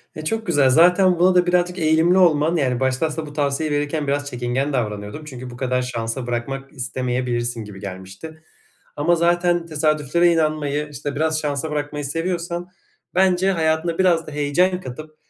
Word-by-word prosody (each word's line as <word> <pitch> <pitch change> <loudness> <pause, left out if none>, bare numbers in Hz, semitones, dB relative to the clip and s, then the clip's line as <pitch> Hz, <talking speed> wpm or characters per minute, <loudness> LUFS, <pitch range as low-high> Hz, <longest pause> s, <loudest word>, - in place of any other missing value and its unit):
E, 155 - -7
çok 225 +4 -2
güzel. 145 -5 +4
Zaten 180 +4 +5
buna 180 +1 +4
da 180 0 +5
birazcık 180 +1 +1
eğilimli 160 +3 +3
olman, 165 -2 +4
yani, 130 -6 0
başta 130 +3 +1
aslında 160 0 -4
bu 145 - -10
tavsiyeyi 145 +1 0
verirken 145 0 -2
biraz 145 +1 -1
çekingen 125 +3 -2
davranıyordum. 105 +3 -3
Çünkü 130 -3 -8
bu 120 - -10
kadar 125 -1 0
şansa 120 0 -4
bırakmak 135 +3 -4
istemeyebilirsin 125 -2 -2
gibi 105 -2 -10
gelmişti. 100 +12 -9 0.5
Ama 165 +4 +2
zaten 175 0 +2
tesadüflere 155 +2 +2
inanmayı, 150 -2 -1
işte, 145 0 -5
biraz 155 +1 +1
şansa 150 +1 -2
bırakmayı 145 0 -3
seviyorsan 170 +3 -3 0.5
bence 190 0 +3
hayatına 165 -1 0
biraz 170 -3 +3
da - - -7
heyecan 175 +6 +1
katıp 155 +2 -9
150 Hz, 160 wpm, -21 LUFS, 130-170 Hz, 0.5 s, Zaten